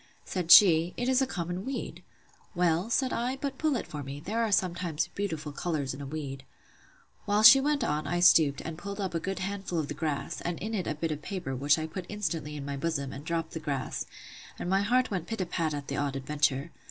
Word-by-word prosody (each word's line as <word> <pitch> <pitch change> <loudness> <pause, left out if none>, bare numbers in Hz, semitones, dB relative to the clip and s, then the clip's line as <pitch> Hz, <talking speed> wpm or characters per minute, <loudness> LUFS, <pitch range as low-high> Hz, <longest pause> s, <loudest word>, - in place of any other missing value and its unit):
Said 180 -3 -3
she, 170 -2 +8
It 245 - -1
is 260 0 +3
a 265 - +2
common 175 -4 -4
weed. 265 +2 -5 0.5
Well, 175 +3 +1
said 255 +2 +1
I, 245 +3 -1
but 275 0 -5
pull 310 -3 +1
it 235 - -2
for 150 - -6
me; 140 +1 -7
there 220 +9 -2
are 225 -2 0
sometimes 175 -5 0
beautiful 160 -7 -3
colours 145 -4 -2
in 135 - -8
a 140 - -6
weed. 135 -2 -6 0.8
While 205 +1 +2
she 265 +5 +10
went 290 -1 +1
on, 150 -5 -1
I 175 - 0
stooped, 155 -5 +5
and 160 0 -6
pulled 200 +2 -6
up 190 -3 -2
a 165 - 0
good 195 +3 -4
handful 195 -1 -3
of 155 -3 -1
the - - -2
grass, 150 -2 -3
and 175 -1 -3
in 215 +3 -5
it 190 -5 -2
a 155 - -1
bit 160 +1 -2
of 150 -1 -4
paper, 175 -6 -4
which 145 +4 +3
I 155 - -2
put 175 +3 -7
instantly 165 -7 -3
in 140 -2 -6
my 140 -1 -4
bosom, 140 -3 -2
and 140 - -8
dropt 165 0 -2
the 160 - -5
grass: 140 -4 -3 0.5
and - - -5
my 190 +2 +2
heart 250 +4 +2
went 180 -4 -3
pit 225 - -4
a 185 - 0
pat 165 -2 -1
at 145 -1 -6
the 140 - -3
odd 140 -1 -1
adventure. 145 +2 0
170 Hz, 240 wpm, -29 LUFS, 150-200 Hz, 0.8 s, she